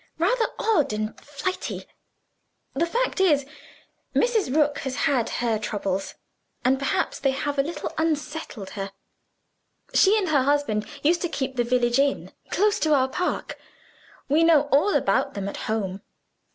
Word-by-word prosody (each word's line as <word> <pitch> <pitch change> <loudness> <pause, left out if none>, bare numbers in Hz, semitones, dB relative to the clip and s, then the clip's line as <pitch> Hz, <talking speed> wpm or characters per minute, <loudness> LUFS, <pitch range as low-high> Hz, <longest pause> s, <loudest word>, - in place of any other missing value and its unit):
Rather 450 +8 +2
odd 345 - +2
and 215 +1 -3
flighty. 295 +6 -4 0.9
The 335 - 0
fact 480 +4 -1
is, 295 -7 +4 0.7
Mrs. 455 - +2
Rook 295 -2 +2
has 265 -2 -4
had 255 -5 +1
her 230 -3 0
troubles; 200 -2 -3 0.5
and 265 +1 +3
perhaps 275 - -1
they 275 - +2
have 280 +1 -2
a - - +7
little 320 +5 -5
unsettled 300 -9 -3
her. 195 -1 -5 1.0
She 405 +3 +5
and 385 -5 0
her 290 -3 +4
husband 265 -6 +1 0.2
used 335 +3 +3
to 350 - -1
keep 265 -3 -3
the 240 - +2
village 240 +1 +2
inn, 280 0 +1 0.2
close 415 +2 +2
to 310 -1 +3
our 260 -1 +2
park: 360 +6 -3 0.7
we 305 +4 +3
know 325 -3 +6
all 300 +9 +4
about - - +1
them 200 -1 -3
at 200 - -5
home. 195 -3 -2
280 Hz, 150 wpm, -25 LUFS, 240-330 Hz, 1.0 s, a